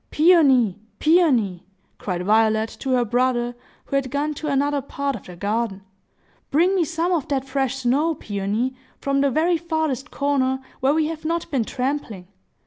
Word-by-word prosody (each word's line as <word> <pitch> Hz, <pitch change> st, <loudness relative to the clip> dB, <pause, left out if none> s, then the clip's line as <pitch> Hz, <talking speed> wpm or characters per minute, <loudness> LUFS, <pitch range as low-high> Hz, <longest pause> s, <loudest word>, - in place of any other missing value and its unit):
"Peony, 275 Hz, -, +4 dB, 0.2 s
Peony!" 260 Hz, -, +3 dB, 0.4 s
cried 180 Hz, -2 st, -3 dB
Violet 220 Hz, +1 st, +3 dB
to 265 Hz, -1 st, -1 dB
her 245 Hz, -1 st, +2 dB
brother, 245 Hz, +1 st, 0 dB, 0.3 s
who -, -, -4 dB
had 275 Hz, -1 st, 0 dB
gone 290 Hz, +3 st, -1 dB
to 300 Hz, +1 st, -6 dB
another 285 Hz, 0 st, +1 dB
part 280 Hz, +1 st, -3 dB
of 220 Hz, -, -10 dB
the 180 Hz, -, -9 dB
garden, 205 Hz, +1 st, -2 dB, 0.7 s
"bring 345 Hz, +6 st, +3 dB
me 370 Hz, -3 st, +2 dB
some 335 Hz, +2 st, -1 dB
of 330 Hz, -6 st, 0 dB
that 270 Hz, -2 st, -1 dB
fresh 270 Hz, -1 st, -1 dB
snow, 275 Hz, +5 st, +1 dB
Peony, 210 Hz, +4 st, -2 dB, 0.3 s
from 275 Hz, 0 st, 0 dB
the 280 Hz, -, +3 dB
very 330 Hz, +5 st, +2 dB
farthest 315 Hz, -4 st, -2 dB
corner, 265 Hz, -2 st, 0 dB, 0.2 s
where 270 Hz, +3 st, +2 dB
we 315 Hz, -1 st, +2 dB
have 315 Hz, 0 st, -5 dB
not 335 Hz, +1 st, -2 dB
been 255 Hz, -6 st, +1 dB
trampling. 250 Hz, -9 st, -3 dB
270 Hz, 165 wpm, -22 LUFS, 235-305 Hz, 0.7 s, Peony